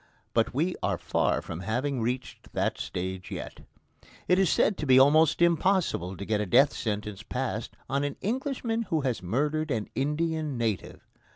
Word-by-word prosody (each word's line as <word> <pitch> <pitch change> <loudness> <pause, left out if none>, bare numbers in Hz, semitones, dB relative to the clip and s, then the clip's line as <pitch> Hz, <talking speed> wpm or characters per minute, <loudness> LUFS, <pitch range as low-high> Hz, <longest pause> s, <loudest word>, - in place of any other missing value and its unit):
But 115 -1 +2
we 165 +8 0
are - - 0
far - - 0
from 85 - -6
having 120 +7 -1
reached 125 +3 -4
that - - 0
stage 95 0 -4
yet. - - -6 0.7
It 180 +1 +4
is 190 -3 +4
said 210 - +3
to 150 - -3
be 130 -1 +7
almost 155 +5 +5
impossible 170 - +2
to 100 - -6
get 105 0 0
a 105 - -2
death 135 +8 +5
sentence 105 -2 -3
passed 120 -2 -4
on 140 +2 0
an 145 -1 -2
Englishman 235 -1 -2
who 160 -2 +1
has 130 -4 -1
murdered 150 - 0
an 110 -6 -2
Indian 150 +1 -1
native. 110 -5 -3
135 Hz, 170 wpm, -28 LUFS, 110-160 Hz, 0.7 s, be